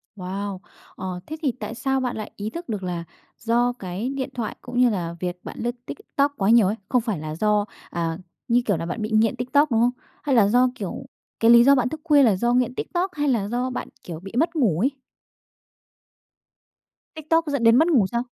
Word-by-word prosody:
Wow! 195 0 -5 0.4
Ờ, 185 -1 -5
thế 315 - -5
thì 285 -5 +1
tại 235 - -5
sao 270 +3 0
bạn 250 -2 -2
lại 215 - -6
ý 210 +1 -4
thức 340 +6 -8
được 210 -4 -3
là 175 -2 -3 0.4
do 240 +2 +1
cái 190 +6 -4
điện 270 -1 -3
thoại 230 -3 -4
cũng 245 0 -4
như 250 -1 +6
là 170 -5 -3
việc 180 0 -4
bạn - - -8
lướt 240 +1 -2
TikTok 290 - -1
quá 195 0 +1
nhiều 230 -4 +6
ấy, 205 - 0
không 250 - +3
phải 220 -7 -3
là 155 0 -5
do, 210 +3 +2 0.2
à, 165 -1 -2 0.3
như 240 +1 +3
kiểu 200 -5 +1
là, 165 - -4
bạn 175 +6 -4
bị 215 - -2
nghiện 220 +2 +3
TikTok, 265 +4 +2
đúng 225 -1 +3
không? 240 +1 +4 0.3
Hay 285 -3 +1
là 215 -4 +6
do, 245 +4 +4
kiểu, 210 +5 -6 0.3
cái 225 +1 +5
lý 235 0 +8
do 280 +2 +6
bạn 250 -1 +1
thức 315 +2 -7
khuya 295 -4 +5
là 220 -6 +4
do 240 +5 +1
nghiện 250 0 +1
TikTok 365 +6 -2
hay 295 -1 -1
là 225 -6 +1
do 245 +4 -1
bạn, 250 - -5 0.2
kiểu, 170 -7 -7
bị 195 +3 -10
mất 335 +2 +1
ngủ 215 - +2
ấy? 250 +8 +3 2.3
TikTok 320 +1 +1
dẫn 280 -4 -1
đến 230 0 +6
mất 315 +6 +5
ngủ 265 - +4
sao? 235 0 0
235 Hz, 225 wpm, -23 LUFS, 200-260 Hz, 2.3 s, lý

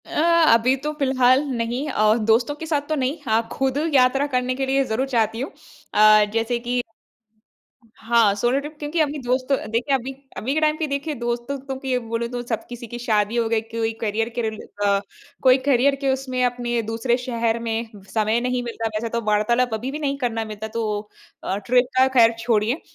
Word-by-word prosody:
अ, - - -14 0.4
अभी 240 +3 +4
तो 300 - -1
फिलहाल 260 0 +3
नहीं 240 +5 -2
अ, 215 -4 +3 0.2
दोस्तों 240 +6 +3
के 320 - -7
साथ 295 -3 -1
तो 310 - +1
नहीं, 270 +2 -1
हाँ 225 0 +1
खुद 270 0 -1 0.2
यात्रा 270 +2 +4
करने 255 -2 -1
के 270 +1 -1
लिए 270 +1 +2
ज़रूर 255 +3 -1
चाहती 230 -2 0
हूँ 275 - -4 0.4
अ, 215 0 +6
जैसे 230 +1 0
कि 245 +1 -1 1.2
हाँ, 225 -2 +3
सोलो 240 +6 +1
ट्रिप 295 +2 -8
क्योंकि 300 +3 -3
अभी 300 -1 +1
दोस्तों 255 +2 0
देखिए 245 +5 +1
अभी 265 0 -3 0.3
अभी 260 +5 -2
के 310 - +1
टाइम 305 0 +3
पे 315 - -1
देखिए 285 +2 -3
दोस्तों-वोस्तों 255 +3 -4
के 265 -2 -1
बोलूँ 230 0 -3
तो 245 0 -4
सब 225 -3 -3
किसी 240 0 -8
की 240 +2 -7
शादी 215 -2 0
हो 230 -1 +1
गई, 225 -1 +1
कोई 225 0 -3
करियर 225 +1 -1
के 240 - 0
रिले 220 -1 -4 0.2
अ, 200 0 +3 0.4
कोई 260 0 +6
करियर 275 0 +3
के 275 - +1
उसमें 255 -1 -2
अपने 240 -1 -1
दूसरे 225 +2 0
शहर 235 -2 -1
में 230 0 -3 0.2
समय 220 +1 +2
नहीं 250 0 -1
मिलता। 230 -1 -3
वैसे 230 +2 -2
तो 235 +1 -2
वार्तालाप 225 +3 +2
अभी 235 +5 -3
भी 300 - -5
नहीं 280 -2 -1
करना 230 -4 -2
मिलता 215 0 -6
तो 220 -2 -2 0.4
अ, 190 - -2
ट्रिप 245 +4 +2
का 260 +1 +6
खैर 230 -1 +6
छोड़िए। 230 +4 +1
240 Hz, 200 wpm, -22 LUFS, 225-265 Hz, 1.2 s, अ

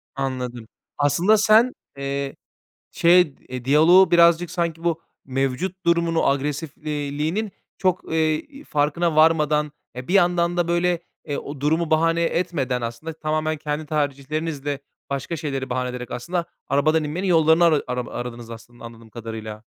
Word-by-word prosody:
Anladım, 125 -4 -4 0.3
aslında 170 +9 +3
sen, 220 +4 +5 0.2
eee, 140 0 -3 0.6
şey, 170 -4 +4
e, 125 -1 -6
diyaloğu 165 +7 +6
birazcık, 170 0 +5
sanki 170 -2 -2
bu 170 -1 0 0.2
mevcut 135 +8 -2
durumunu 170 -1 +2
agresifliğinin 150 +5 -2 0.3
çok, 185 -3 -1
eee, 160 - -1
farkına 155 - 0
varmadan, 150 -2 +3 0.2
e, 125 +1 -7
bir 180 - -2
yandan 175 -2 +3
da 175 -1 +1
böyle, 175 0 +1 0.3
e, 145 -2 -3
o 140 -1 -7
durumu 160 +3 +1
bahane 165 +1 +2
etmeden 155 -8 -1
aslında 120 +8 -5
tamamen 155 0 -2
kendi 150 +1 -4
tercihlerinizle 145 0 -2 0.3
başka 140 +4 -3
şeyleri 140 -4 -4
bahane 125 0 -1
ederek 125 0 -7
aslında 170 +8 -3 0.2
arabadan 155 +3 +2
inmenin 165 +6 -3
yollarını 160 -1 +4
ara 155 -3 +3
arama 125 -1 -3
aradınız 120 -1 -6
aslında 115 +1 -11
anladığım 115 -1 -12
kadarıyla. 110 -1 -7
155 Hz, 135 wpm, -23 LUFS, 135-170 Hz, 0.6 s, diyaloğu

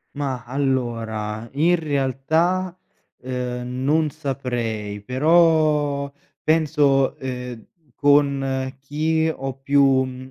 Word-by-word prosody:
Ma, 135 -5 -3
allora, 115 -5 -2
in 165 +5 +3
realtà, 160 +5 0 0.4
ehm, 125 0 -4
non 155 +2 +2
saprei, 120 -7 -4
però 150 0 +3 0.3
penso, 150 -4 +2
ehm, 125 -3 -6 0.3
con 140 -2 +2
chi 160 +3 0
ho 135 0 -5
più 130 -2 +2
135 Hz, 80 wpm, -22 LUFS, 125-150 Hz, 0.4 s, in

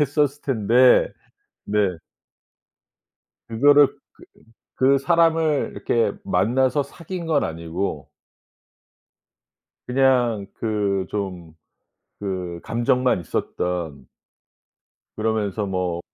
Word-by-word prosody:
했었을 145 0 0
텐데 125 0 +4 0.5
네. 105 +1 -2 1.7
그거를 145 +5 +5
그 - - -20 0.8
그 135 +1 +4
사람을 165 0 +2
이렇게 115 -3 0
만나서 125 +9 +1
사귄 170 +3 -7
건 155 -3 +2
아니고 85 +4 -4 1.8
그냥 125 -5 +2
그 100 -4 -1
좀 90 -6 -5 0.7
그 90 -3 -4
감정만 125 -2 +1
있었던 85 -5 -4 1.1
그러면서 105 -2 -1
뭐 90 -3 -2
110 Hz, 155 characters per minute, -22 LUFS, 95-135 Hz, 1.8 s, 그거를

